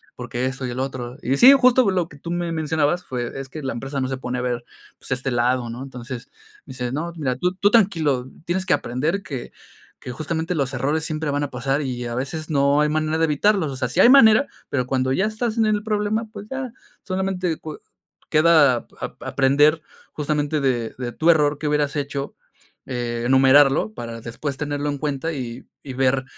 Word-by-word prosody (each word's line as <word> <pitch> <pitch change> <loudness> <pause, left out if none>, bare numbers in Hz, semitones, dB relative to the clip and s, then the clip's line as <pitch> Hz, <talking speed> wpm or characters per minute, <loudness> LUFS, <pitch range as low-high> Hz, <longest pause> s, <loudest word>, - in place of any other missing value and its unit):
porque 125 0 -4
eso 130 0 -4
y 125 - -3
el 125 - -5
otro". 130 -2 -4
Y 135 +3 0
sí, 260 +3 +9
justo 255 -4 +5
lo 180 -3 -1
que 150 - -14
tú 170 +4 -7
me 175 -1 -2
mencionabas 160 +2 0
fue 125 0 -4
Es 135 - -6
que 155 +2 -7
la 130 - -2
empresa 135 +3 -4
no 130 - -1
se 130 - -3
pone 125 -1 -4
a - - -2
ver, 120 -1 -2 0.3
pues, - - -12
este 130 +1 -1
lado, 120 0 +1
¿no? 120 +3 -6
Entonces, 125 -2 -8 0.4
me - - -11
dice: 125 -1 -4
"No, 165 +5 -3
mira, 135 -6 -1
tú 180 +5 0
tú 200 +2 +3
tranquilo, 160 - +2 0.2
tienes 185 +2 -1
que 185 - +2
aprender 150 +11 -1
que 130 -5 -6 0.5
que 125 - -7
justamente 160 +5 -3
los 135 -3 -1
errores 145 +5 0
siempre 155 -1 -3
van 145 +1 -1
a 145 - -3
pasar 135 +3 -1
y, 125 -3 -4
a 120 - -4
veces, 155 +5 -4
no 140 -1 +3
hay 150 - +3
manera 155 +1 0
de 165 - +3
evitarlos. 165 +3 +2
O - - -6
sea, 130 -1 -2
sí 180 - -2
hay - - +8
manera, 255 -1 +7 0.2
pero 125 -3 -1
cuando 130 0 0
ya 190 - +1
estás 220 +1 -2
en 225 - +3
el 210 -1 +1
problema, 215 +1 -1
pues, 210 -1 -9
ya, 265 -2 -4 0.3
solamente 185 -3 -2
cue 155 -1 -8 0.5
queda 155 -6 +4
ap-aprender 145 +4 +2 0.3
justamente 150 0 -1
de 120 -4 -1
de 125 -2 -4
tu 160 +8 +1
error 150 -2 +2
que 155 - -2
hubieras 150 -1 0
hecho, 140 0 -4 0.5
enumerarlo 130 +1 +3
para 115 0 -7
después 135 +5 -5
tenerlo 145 0 -3
en 145 -1 -3
cuenta, 150 +2 -2
y 125 -3 -6 0.2
y 135 - -7
ver 130 +1 +1
145 Hz, 205 wpm, -22 LUFS, 130-165 Hz, 0.5 s, sí